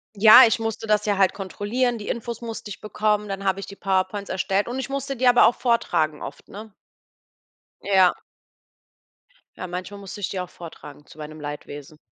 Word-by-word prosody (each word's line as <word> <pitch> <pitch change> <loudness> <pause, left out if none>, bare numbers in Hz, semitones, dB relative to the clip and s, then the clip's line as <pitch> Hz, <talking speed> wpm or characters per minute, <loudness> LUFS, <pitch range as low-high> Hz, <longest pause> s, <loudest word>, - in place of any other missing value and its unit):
Ja, 220 +5 +9
ich 225 +1 +1
musste 225 0 -4
das 210 0 +2
ja 205 -2 0
halt 195 -1 +3
kontrollieren. 225 +5 -2
Die 205 - -7
Infos 235 0 -4
musste 225 -2 -7
ich 195 - -9
bekommen, 210 -1 -1
dann 195 0 -5
habe 190 +1 0
ich - - -6
die 200 - -12
PowerPoints 195 +1 -1
erstellt 190 +2 -1
und 250 +2 -4
ich 265 - -4
musste 275 0 -3
die 255 +1 +1
aber 245 0 +6
auch 235 - +1
vortragen 160 - 0
oft, - - -9
ne? 210 0 -10 1.1
Ja. 190 -2 +4 1.4
Ja, 185 - -6
manchmal 185 +3 -6
musste 200 +1 -9
ich - - -2
die 190 - -4
auch 180 0 -5
vortragen 150 -4 -12
zu - - -17
meinem 155 0 -9
Leidwesen. 145 0 -8
200 Hz, 190 wpm, -23 LUFS, 185-225 Hz, 1.4 s, Ja